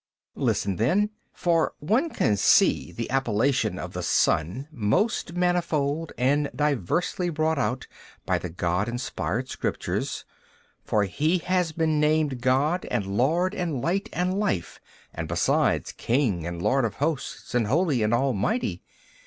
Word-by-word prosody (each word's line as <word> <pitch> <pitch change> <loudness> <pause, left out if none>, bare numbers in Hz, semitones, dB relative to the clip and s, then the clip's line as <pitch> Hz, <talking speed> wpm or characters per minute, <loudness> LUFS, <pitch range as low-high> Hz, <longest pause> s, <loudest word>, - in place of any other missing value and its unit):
B. - - -11
Listen 100 -3 0
then: 195 - +2 0.2
for 170 -2 +1
one 225 - +1
can 105 - +1
see - - +4
the 115 0 -4
appellation 135 0 +1
of - - -6
the - - -3
Son 90 - +1
most 155 - 0
manifold 165 -4 0
and 145 +4 +2
diversely 150 - 0
brought 160 -1 0
out 130 -1 -1 0.4
by - - +1
the - - -5
God 90 +5 -1
inspired 120 -2 -3
Scriptures, - - -3 0.6
for 105 - +1
He 155 - +1
has 180 -1 0
been 155 -1 +1
named 150 -4 +1
God 140 +8 +2
and 115 -5 -1
Lord 170 - +2
and 170 -9 -2
Light 195 - -1
and 185 +2 -1
Life 95 - -2 0.3
and 80 -1 -4
besides 85 +1 +1
King 115 - 0
and 85 0 -5
Lord 135 0 +2
of 115 - -1
hosts 150 0 -3
and 120 -3 +2
Holy 150 - +2
and 105 0 +1
Almighty. 130 - 0
140 Hz, 145 wpm, -26 LUFS, 115-170 Hz, 0.6 s, see